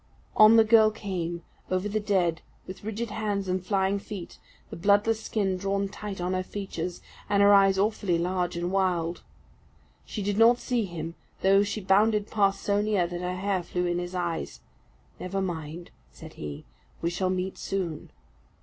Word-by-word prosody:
On 215 +1 +8
the 225 - +7
girl 220 0 +6
came, 180 -6 -4 0.3
over 185 +2 0
the 210 +1 -1
dead, 185 -6 +1 0.2
with 185 +2 -9
rigid 220 +1 -4
hands 205 -3 -2
and 185 0 -1
flying 195 +1 +1
feet, 200 -3 -8 0.3
the - - -5
bloodless 205 +5 +2
skin 195 -4 -1
drawn 195 +1 -1
tight 205 -1 -7
on 180 +1 -1
her 185 - 0
features, 180 -3 -5 0.3
and 200 0 +4
her 205 0 +7
eyes 195 -1 +5
awfully 200 -3 +1
large 180 0 -1
and 175 +1 -2
wild. 180 -3 0 0.8
She 210 - -5
did 205 +1 -1
not 235 +1 +7
see 245 -3 -1
him 165 -2 -6 0.3
though 195 +1 +5
she 205 +1 -2
bounded 205 +2 +2
past 200 -2 +1
so 205 0 +2
near 210 -4 +1
that 175 0 -5
her 180 0 -2
hair 190 0 -1
flew 180 +1 -2
in 175 0 0
his 175 +1 -5
eyes. 175 -2 -3 0.6
"Never 185 +2 -3
mind!" 170 -2 -5 0.2
said - - -12
he, 75 -1 -7 0.4
"we 170 - +1
shall 185 +1 -1
meet 185 0 -2
soon." 175 -6 -3
195 Hz, 175 wpm, -27 LUFS, 175-205 Hz, 0.8 s, On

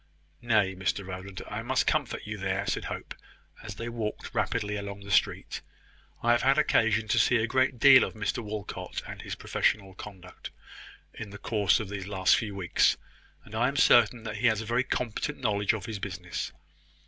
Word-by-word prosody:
"Nay, 110 -5 +2
Mr 95 +1 -2
Rowland, 95 +1 -7
I - - -4
must - - +1
comfort - - 0
you 105 0 -5
there," 95 +1 -1
said - - -2
Hope, - - -6 0.5
as 110 -2 -7
they 115 - -5
walked 115 -3 -4
rapidly 105 0 -1
along 100 -1 -6
the 100 0 -8
street. - - +1 0.6
"I 120 - +4
have 120 - +3
had 135 +2 +3
occasion 110 -7 +3
to 120 - +3
see 125 - +4
a 110 - +1
great 130 +2 +1
deal 130 +2 +8
of - - -4
Mr 105 -1 -2
Walcot 105 -1 -5
and - - -7
his - - -5
professional 100 -3 0
conduct, 95 -2 -10 0.6
in 105 - -7
the 100 - -9
course 105 -2 +2
of 110 - -4
the 100 -1 -4
last 95 -1 +3
few 105 -3 -3
weeks; 95 -3 +2 0.5
and - - -14
I - - +2
am - - -2
certain 120 -2 +5
that 110 -1 -5
he 120 +3 +2
has 110 -2 +2
a 110 - -5
very 120 +3 +1
competent 125 +4 -3
knowledge 105 -5 +1
of 110 -3 -5
his 110 -3 -5
business. 90 -3 -5
105 Hz, 195 wpm, -28 LUFS, 100-115 Hz, 0.6 s, deal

